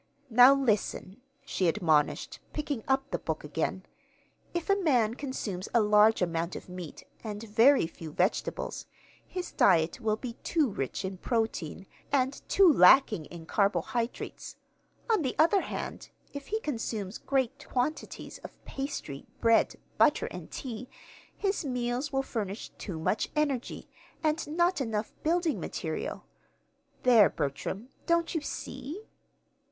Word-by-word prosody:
Now 250 +4 +8
listen," 220 -4 -1 0.2
she 185 - 0
admonished, 160 -5 +1
picking 290 -6 -3
up 270 +1 +1
the - - -1
book - - -3
again. - - -2 0.7
"'If 345 -1 -3
a 395 - +4
man 245 - +3
consumes 235 -9 -4
a - - +7
large 210 0 +5
amount 170 0 -2
of - - -8
meat, 180 -3 -8 0.2
and 210 -1 -5
very 230 - +5
few 165 -1 -8
vegetables, 180 +7 -1 0.4
his 360 -1 -5
diet 170 +4 +3
will 215 -2 +1
be 235 +1 -6
too 315 -5 +2
rich 135 +3 -3
in 190 0 -4
protein, 215 -7 -2 0.3
and 270 -1 +1
too 390 -1 +6
lacking 195 - +6
in 170 0 -10
carbohydrates. 220 +5 -1 0.5
On 445 -6 +3
the 260 -4 -1
other 335 +5 +5
hand, - - -6 0.2
if 280 -1 -7
he 440 - -1
consumes 225 - -3
great 265 -3 -1
quantities 260 +5 -3
of - - -11
pastry, 270 - -5
bread, 230 -1 +4 0.2
butter, - - +4
and - - -8
tea, 245 -1 -6 0.5
his 395 -2 0
meals 250 +1 -2
will 270 -1 0
furnish 210 -5 -4
too 185 -6 -5
much 160 +7 0
energy, 285 -5 -1 0.4
and 310 0 0
not 345 +1 +1
enough 220 -3 -2
building 335 0 +1
material.' - - -4 0.8
There, 235 -5 +7
Bertram, 155 - -4 0.2
don't 335 -1 +2
you 325 - -1
see?" 290 - -6
240 Hz, 135 wpm, -29 LUFS, 200-285 Hz, 0.8 s, Now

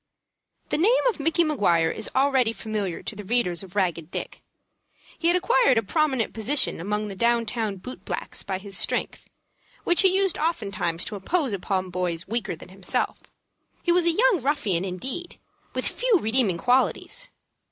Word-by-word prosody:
The 295 - 0
name 460 +10 +3
of 450 - -4
Micky 325 +4 +2
Maguire 175 - +2
is 220 - -2
already 265 -4 +3
familiar 210 -6 -4
to - - -5
the 210 - -7
readers 190 -5 +1
of 190 0 -11
"Ragged 175 -5 -1
Dick." - - -6 0.8
He 335 - +1
had 350 +1 +4
acquired 270 -8 +3
a 225 - +2
prominent 265 - +1
position 230 - +2
among 210 +3 -2
the 200 - -7
down 235 +3 +2
town 220 -3 -2
boot 250 +7 -10
blacks - - -4
by 190 -1 -3
his 195 0 -5
strength, - - 0 0.5
which 350 - +4
he 380 -2 +4
used 390 -3 0
oftentimes 200 - -1
to 210 - -4
impose 265 - -1
upon 185 -1 -2
boys 175 -1 -2
weaker 230 -3 -2
than 165 - -13
himself. 190 0 -2 0.6
He 350 - +2
was 350 0 +3
a 340 - +5
young 445 +2 +3
ruffian, 215 - 0
indeed, 260 - -5 0.4
with - - +1
few - - +2
redeeming 220 - +2
qualities. 265 - +1
225 Hz, 170 wpm, -25 LUFS, 190-305 Hz, 0.8 s, a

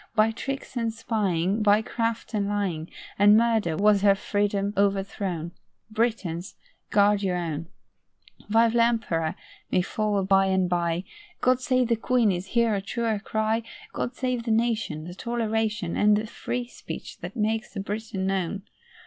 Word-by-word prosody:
By 220 +1 +4
tricks 270 +4 -5
and 230 -2 0
spying, 210 -4 0
By 210 +1 +4
craft 230 +1 -2
and 205 -2 0
lying, 185 -6 -2 0.3
And 205 +1 +7
murder 220 -8 +2
was 205 -1 +4
her 200 -1 +5
freedom 205 0 -1
overthrown. 195 -4 -1 0.4
Britons, 215 -6 -1 0.3
guard 205 0 +4
your 185 -3 0
own. 165 -2 -3 0.8
'Vive 225 +1 +4
l'Empereur' 225 -9 +1 0.4
may 180 - +3
follow 210 0 0
by 195 0 +4
and 190 -1 +2
bye; 175 0 0 0.4
'God 255 0 +2
save 255 -1 +2
the 230 - +4
Queen' 230 -1 +2
is 180 +1 -3
here 235 0 +2
a 200 - 0
truer 225 +1 -1
cry. 220 +2 0 0.3
God 245 - -3
save 250 -3 -2
the - - -3
Nation, 225 -8 0
The 175 +2 -8
toleration, 220 -3 -1
And 210 0 +4
the 215 - -2
free 245 +2 -4
speech - - -8
that - - -7
makes 220 +1 -1
a - - -3
Briton 205 -1 -3
known. 195 0 -1
210 Hz, 155 wpm, -26 LUFS, 190-230 Hz, 0.8 s, And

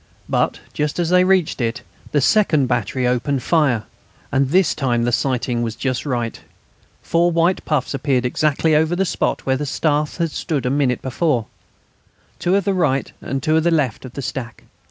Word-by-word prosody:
But - - 0
just 150 0 -2
as 175 -1 0
they 180 0 +5
reached 185 -7 +2
it 120 +2 -2 0.3
the 145 - +2
second 155 - +3
battery 125 0 -1
opened 125 +2 0
fire, 140 -10 +2 0.5
and 135 0 +2
this 185 +2 +3
time 120 -5 0
the 120 - +1
sighting 125 -1 0
was 115 -2 -2
just 130 +3 -2
right. 120 -4 -1 0.7
The - - -24
four 170 +1 +3
white 170 +2 +1
puffs 150 -4 -1
appeared 135 -2 0
exactly 155 +4 +1
over 160 +3 +2
the 195 +2 +1
spot - - -1
where 130 0 +1
the 145 +1 -3
Staff 150 +1 0
had 165 -3 -1
stood 145 -4 -2
a 125 - +1
minute 135 -3 0
before 130 -3 0 0.9
two 175 - +1
to 200 - +3
the 200 0 0
right 150 -7 0
and 135 -1 -4
two 155 - +1
to 160 - +4
the 170 - +2
left 150 -8 0
of 130 -2 -9
the 140 - -5
stack. 120 0 -6
140 Hz, 195 wpm, -20 LUFS, 125-160 Hz, 0.9 s, they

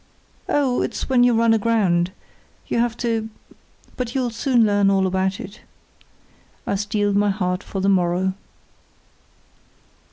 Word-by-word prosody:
"Oh, 270 -4 +1
it's - - -4
when 250 -2 +4
you 245 -1 +4
run 230 0 +3
aground; 200 -6 +1 0.5
you - - -1
have 235 0 0
to—but 230 +1 -6
you'll 250 -3 0
soon 235 0 +2
learn 205 -1 +3
all 195 -1 +2
about 190 +1 -1
it." 195 - -10 1.0
I - - -1
steeled 205 0 -1
my 205 0 +3
heart 180 -2 -1
for 195 - -5
the 195 - 0
morrow. 185 0 +1
205 Hz, 130 wpm, -21 LUFS, 190-230 Hz, 1.0 s, when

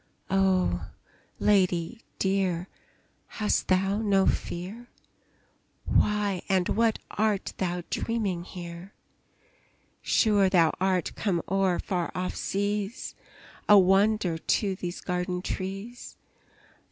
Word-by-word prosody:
Oh, 185 - +2 0.5
lady 190 +2 +1 0.2
dear, 190 -2 0 0.7
hast 215 -1 +1
thou 195 +2 +2
no 200 -3 +3
fear? 200 +8 -3 1.0
Why 205 -3 +1
and 185 -2 +2
what 225 0 +2
art 210 -2 0
thou 180 -1 -2
dreaming 205 -7 -1
here? 175 +1 -9 1.1
Sure 205 -4 +3
thou 170 -4 +4
art 185 -2 0
come 180 -6 -1
o'er 190 -2 +1
far 175 -3 -2
off 180 0 -2
seas, 205 +2 -2 0.6
A 210 - +9
wonder 195 -2 +3
to 195 +3 0
these 175 -1 -5
garden 180 0 -2
trees! 195 +7 -6
190 Hz, 100 wpm, -27 LUFS, 180-205 Hz, 1.1 s, A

